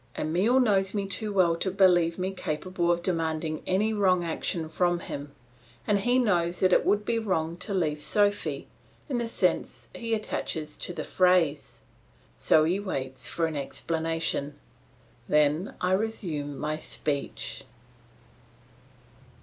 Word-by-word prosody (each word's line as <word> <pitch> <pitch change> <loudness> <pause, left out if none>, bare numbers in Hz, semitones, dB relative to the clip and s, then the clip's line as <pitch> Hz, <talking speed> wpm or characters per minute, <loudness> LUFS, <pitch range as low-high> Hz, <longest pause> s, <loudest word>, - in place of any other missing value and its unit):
Emile 190 +12 +2
knows 195 -5 +2
me 200 -1 0
too 210 +2 -3
well 180 -4 +3
to 180 +3 -1
believe 180 -3 +3
me 185 +1 -2
capable 175 +1 -2
of 170 0 +1
demanding 160 -3 -1
any 210 +4 +1
wrong 185 -4 +3
action 165 0 -2
from 175 +2 +1
him, 145 -2 -6 0.5
and 205 -1 +2
he 245 +5 +2
knows 175 -8 +1
that 185 -1 +4
it - - +4
would 205 0 +1
be 230 +1 +1
wrong 170 -6 -1
to 190 +4 -4
leave 160 -6 0
Sophy, 205 +4 +1 0.4
in 260 -5 -1
the 235 - -2
sense 230 - -1
he 230 -1 -1
attaches 160 -7 -4
to - - -3
the 175 - -5
phrase. 180 -6 +1 0.5
So 155 - +4
he 175 +5 +1
waits 135 -10 -4
for 165 - 0
an 160 -1 -3
explanation. 160 0 -2 0.7
Then 150 +5 +2
I 180 - 0
resume 175 -9 -2
my 155 +1 -2
speech. 145 -2 -3
175 Hz, 140 wpm, -27 LUFS, 160-200 Hz, 0.7 s, that